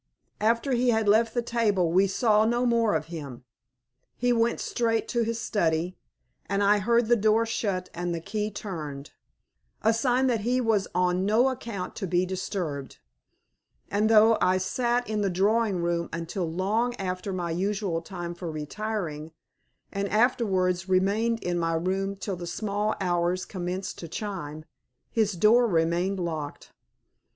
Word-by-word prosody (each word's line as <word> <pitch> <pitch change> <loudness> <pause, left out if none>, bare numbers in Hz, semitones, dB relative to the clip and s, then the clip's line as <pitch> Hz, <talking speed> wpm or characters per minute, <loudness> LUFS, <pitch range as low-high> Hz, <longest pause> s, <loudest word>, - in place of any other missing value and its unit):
After 230 +5 +1
he 250 0 +2
had 220 -2 +2
left 220 +3 +3
the 240 - +1
table 210 -8 +1
we 190 +3 +4
saw 215 +1 +3
no 240 +2 +1
more 230 -5 +2
of 155 -1 -1
him. 140 -6 -7 0.7
He 245 0 +2
went 230 0 +1
straight 225 -1 0
to 235 - +1
his 230 0 -1
study, 170 -4 0 0.5
and 200 +1 0
I 205 +1 +4
heard 235 +3 +2
the 240 +2 +4
door 220 +1 +3
shut 200 -5 -2
and 175 +1 -3
the 170 - -2
key 210 +4 -3
turned 155 -9 -6 0.7
a 225 +1 +4
sign 250 +3 +2
that 245 -4 +2
he 245 +4 +1
was 220 -5 +1
on 180 0 +2
no 235 +5 +4
account 230 -7 -5
to 195 - -3
be 180 +1 +2
disturbed; 175 -7 -4 0.9
and 210 +2 +2
though 225 0 +6
I 185 +1 +3
sat 240 +6 0
in 215 -1 -1
the 200 - +1
drawing 200 0 +1
room 170 0 -1
until 170 +1 -3
long 215 +8 0
after 185 -1 -4
my 175 -2 -2
usual 190 -1 -1
time 175 0 -6
for 175 0 -6
retiring, 160 -1 -4 0.6
and 200 0 -2
afterwards 190 -6 +1
remained 210 +5 +1
in 175 -1 -1
my 165 0 0
room 190 +4 -1
till 195 0 -4
the 175 0 -6
small 210 +3 -1
hours 180 -1 0
commenced 185 +1 -4
to 170 - -7
chime, 160 -5 -5 0.5
his 215 -3 +1
door 225 +7 +5
remained 175 +2 +1
locked. 160 -4 -5
195 Hz, 160 wpm, -27 LUFS, 175-225 Hz, 0.9 s, though